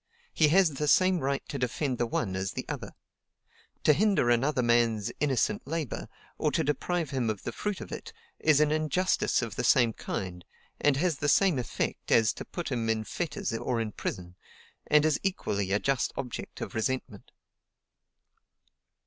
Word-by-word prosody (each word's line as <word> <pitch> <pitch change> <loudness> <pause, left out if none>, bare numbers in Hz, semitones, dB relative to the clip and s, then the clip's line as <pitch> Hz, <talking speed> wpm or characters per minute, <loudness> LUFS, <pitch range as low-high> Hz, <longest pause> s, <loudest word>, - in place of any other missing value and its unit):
He 155 - +4
has 175 +1 +4
the 150 +2 -2
same 185 +4 +4
right 140 -1 -2
to 140 - -4
defend 125 +1 -1
the 120 - +1
one 100 -4 -2
as 95 +1 -2
the - - -4
other. - - -6 0.9
To 150 - +6
hinder 195 - +3
another 130 +2 +2
man's 115 -3 +2
innocent 135 -5 0
labor, 160 -5 -4 0.3
or - - +1
to - - +2
deprive 160 +3 -1
him 130 -4 0
of 105 -3 -3
the - - -3
fruit 205 - -3
of - - -8
it, - - -7 0.3
is 155 -2 +4
an 150 -1 +3
injustice 155 -1 +1
of 110 -3 -5
the - - -1
same 120 -4 +4
kind, 90 -4 -5 0.4
and 145 -2 +3
has 165 -2 0
the 145 - +1
same 180 -4 +4
effect 120 - -3
as 110 -2 +5
to - - -8
put 175 -4 -5
him 115 -3 -1
in 110 -1 +1
fetters 155 +1 -3
or 115 +1 -1
in 110 -2 -2
prison, 90 -3 -5 0.5
and 150 0 +5
is 155 -2 +2
equally 100 - -1
a 100 - +4
just 135 +3 0
object 125 -3 -6
of - - -5
resentment." 110 -2 -3
135 Hz, 175 wpm, -29 LUFS, 115-155 Hz, 0.9 s, To